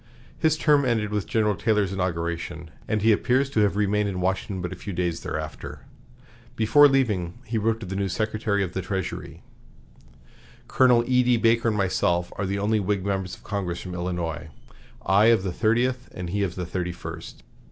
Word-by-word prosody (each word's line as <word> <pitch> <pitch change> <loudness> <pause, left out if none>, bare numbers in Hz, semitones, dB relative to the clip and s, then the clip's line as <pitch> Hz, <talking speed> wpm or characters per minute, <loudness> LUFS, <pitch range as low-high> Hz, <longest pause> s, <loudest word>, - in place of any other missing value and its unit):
His 160 -1 +1
term 150 -3 +4
ended 110 -5 0
with 105 -2 -2
General 105 -2 +1
Taylor's 100 0 0
inauguration, 85 -2 -3 0.2
and 110 -2 -1
he 110 - +5
appears 130 +6 +2
to 110 - 0
have 105 -2 +3
remained 105 0 +1
in 95 -2 -4
Washington 95 +1 -1
but 90 0 -4
a - - -5
few 100 +2 -7
days 85 -1 -1
thereafter. - - -6 0.7
Before 115 +7 +6
leaving, 105 -11 0
he 115 0 -1
wrote 110 +1 0
to - - -5
the 95 +1 -5
new 100 0 -1
Secretary 110 0 -1
of 90 -2 -5
the 95 - -2
Treasury: 95 0 -5 1.2
"Colonel 125 -2 +4
E.D. 125 -1 +3
Baker 115 +1 +2
and 110 -2 +1
myself 90 -2 0
are 100 - -1
the 100 +1 -1
only 105 +2 +1
Whig 100 -1 -1
members 95 -2 -2
of - - -21
Congress 95 -4 -3
from 90 - -7
Illinois 85 -3 -3 0.6
I 100 +4 +4
of 115 -4 +4
the 95 -3 -3
Thirtieth, 120 +5 0
and 90 -1 -5
he 100 +2 -1
of 95 -3 -1
the 90 - -4
Thirty 90 0 -3
first. - - -9
100 Hz, 185 wpm, -25 LUFS, 90-110 Hz, 1.2 s, Before